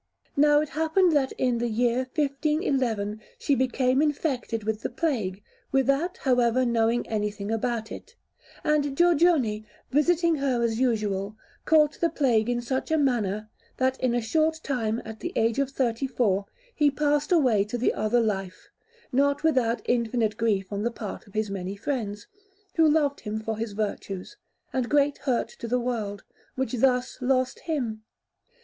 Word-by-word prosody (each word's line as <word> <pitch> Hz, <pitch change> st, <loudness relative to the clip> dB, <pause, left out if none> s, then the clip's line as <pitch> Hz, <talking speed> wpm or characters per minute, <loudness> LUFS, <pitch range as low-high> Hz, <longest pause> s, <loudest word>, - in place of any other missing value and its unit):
Now 295 Hz, +1 st, +5 dB
it 305 Hz, -, -3 dB
happened 320 Hz, +4 st, +2 dB
that 280 Hz, -4 st, +2 dB
in 245 Hz, -2 st, 0 dB
the 240 Hz, -, 0 dB
year 235 Hz, +2 st, +1 dB, 0.2 s
1511 275 Hz, -, 0 dB, 0.2 s
she 285 Hz, -, 0 dB
became 260 Hz, +1 st, +2 dB
infected 275 Hz, -7 st, -1 dB
with 215 Hz, 0 st, -2 dB
plague, 210 Hz, -, -1 dB, 0.3 s
without, 275 Hz, +7 st, +1 dB
however, 250 Hz, -1 st, +2 dB
knowing 235 Hz, 0 st, +1 dB
anything 210 Hz, -1 st, -2 dB
about 225 Hz, 0 st, -2 dB
it; 470 Hz, -, -10 dB, 0.5 s
and 290 Hz, -2 st, +1 dB
Giorgione, 320 Hz, -11 st, +3 dB, 0.3 s
visiting 330 Hz, +3 st, +3 dB
her 260 Hz, -4 st, 0 dB
as 225 Hz, -1 st, 0 dB
usual, 210 Hz, -5 st, 0 dB, 0.3 s
caught 305 Hz, -2 st, +4 dB
the 335 Hz, -, +3 dB
plague 240 Hz, -7 st, +2 dB
in 240 Hz, 0 st, -1 dB
such 260 Hz, +2 st, -2 dB
a 320 Hz, -, +2 dB
manner, 215 Hz, -7 st, 0 dB, 0.3 s
that 260 Hz, 0 st, +1 dB
in 250 Hz, -2 st, +1 dB
a 240 Hz, -, +1 dB
short 315 Hz, +6 st, +1 dB
time, 230 Hz, -4 st, -1 dB
at 220 Hz, 0 st, -8 dB
the 345 Hz, -, -5 dB
age 225 Hz, +3 st, +1 dB
of 275 Hz, -1 st, +1 dB
thirty 260 Hz, -1 st, -1 dB
four, 205 Hz, -6 st, 0 dB, 0.3 s
he 295 Hz, -2 st, +3 dB
passed 295 Hz, +2 st, 0 dB
away 255 Hz, -, +4 dB
to 220 Hz, +4 st, -4 dB
the 240 Hz, -, +1 dB
other 215 Hz, +3 st, +1 dB
life, 195 Hz, -4 st, -3 dB, 0.4 s
not 280 Hz, +3 st, +2 dB
without 245 Hz, -7 st, +2 dB
infinite 230 Hz, -2 st, +1 dB
grief 210 Hz, -4 st, 0 dB
on 200 Hz, -, -2 dB
the 235 Hz, -, +1 dB
part 220 Hz, -4 st, -7 dB
of 200 Hz, -, -19 dB
his 215 Hz, -2 st, -1 dB
many 190 Hz, 0 st, -4 dB
friends, 210 Hz, -3 st, -3 dB, 0.5 s
who 320 Hz, -2 st, +4 dB
loved 295 Hz, -2 st, +2 dB
him 215 Hz, 0 st, -4 dB
for 220 Hz, 0 st, -3 dB
his 220 Hz, -1 st, -4 dB
virtues, 200 Hz, -, -4 dB, 0.4 s
and 255 Hz, -2 st, -1 dB
great 290 Hz, -1 st, +2 dB
hurt 255 Hz, -4 st, 0 dB
to 235 Hz, -, -8 dB
the 250 Hz, +2 st, +1 dB
world, 220 Hz, -5 st, -3 dB, 0.3 s
which 260 Hz, -3 st, -2 dB
thus 250 Hz, 0 st, +1 dB
lost 255 Hz, 0 st, +1 dB
him. 245 Hz, -10 st, -3 dB
245 Hz, 160 wpm, -26 LUFS, 220-285 Hz, 0.5 s, Now